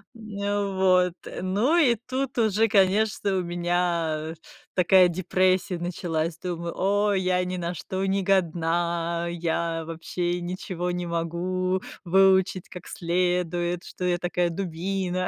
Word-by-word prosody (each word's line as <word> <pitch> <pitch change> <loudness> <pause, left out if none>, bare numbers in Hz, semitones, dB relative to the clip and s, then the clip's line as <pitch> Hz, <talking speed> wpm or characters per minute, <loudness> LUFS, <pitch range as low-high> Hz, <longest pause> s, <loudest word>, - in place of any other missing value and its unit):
Н 205 -2 -3
вот, 185 -2 +4 0.3
ну, 205 - +2
и 265 -8 +5
тут 255 +3 -4
уже, 220 0 +3
конечно, 200 0 +2
у 185 - 0
меня 170 -2 -1 0.4
такая 185 0 +5
депрессия 185 +1 +1
началась. 170 -2 -3
Думаю: 170 -1 -4
"О, 205 +2 +2
я 185 -1 +1
ни 185 0 -3
на 175 0 -3
что 190 +4 -4
не 195 0 0
годна, 170 -2 0
я 165 -1 -2
вообще 175 +2 -3
ничего 180 0 -4
не 180 0 -2
могу 180 +2 -1 0.2
выучить 190 0 +3
как 180 -1 -10
следует, 175 0 -1
что - - -8
я 180 -1 +2
такая 175 0 0
дубина". 185 +1 -2
180 Hz, 125 wpm, -25 LUFS, 170-190 Hz, 0.4 s, и